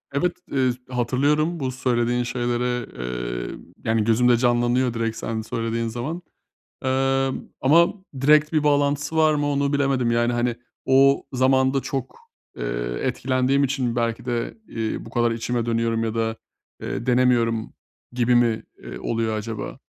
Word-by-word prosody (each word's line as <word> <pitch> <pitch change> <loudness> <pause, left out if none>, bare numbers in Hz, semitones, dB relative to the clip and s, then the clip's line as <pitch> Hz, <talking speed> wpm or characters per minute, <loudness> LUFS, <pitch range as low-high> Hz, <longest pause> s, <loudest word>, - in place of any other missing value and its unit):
Evet, 175 +4 0
eee, 130 -2 +2 0.2
hatırlıyorum 145 +7 +1
bu 130 -2 -2
söylediğin 120 -1 0
şeyleri. 120 0 -1 0.6
Eee, - - -6 0.3
yani 110 -1 +2
gözümde 120 +1 +4
canlanıyor 120 0 +2
direkt 115 -1 -2
sen 110 0 -3
söylediğin 115 +1 -2
zaman. 130 +10 -4 0.6
Emm, 135 0 0
ama 165 +6 +5 0.3
direkt 150 +2 +4
bir 155 - +2
bağlantısı 145 +1 +1
var 155 -1 +5
mı 145 0 0
onu 140 0 0
bilemedim 135 -4 +1
yani, 120 +1 +2
hani, 120 0 0 0.3
o 135 +1 +4
zamanında 130 +1 +3
çok, 135 -2 -5 0.4
eee, - - -3
etkilendiğim 130 +2 +1
için 130 -3 -1
belki 115 0 -1
de, 120 - -2
eee, 110 0 -3
bu - - -10
kadar 120 0 +1
içime 115 +1 -2
dönüyorum 115 -1 0
ya 115 0 -2
da, 115 0 0 0.5
eee, 115 - -4
denemiyorum 120 -3 +2 0.4
gibi 120 0 +2
mi, 115 -2 +2 0.2
eee, - - -8
oluyor 115 -1 -1
acaba? 110 0 -5
125 Hz, 140 wpm, -23 LUFS, 115-135 Hz, 0.6 s, ama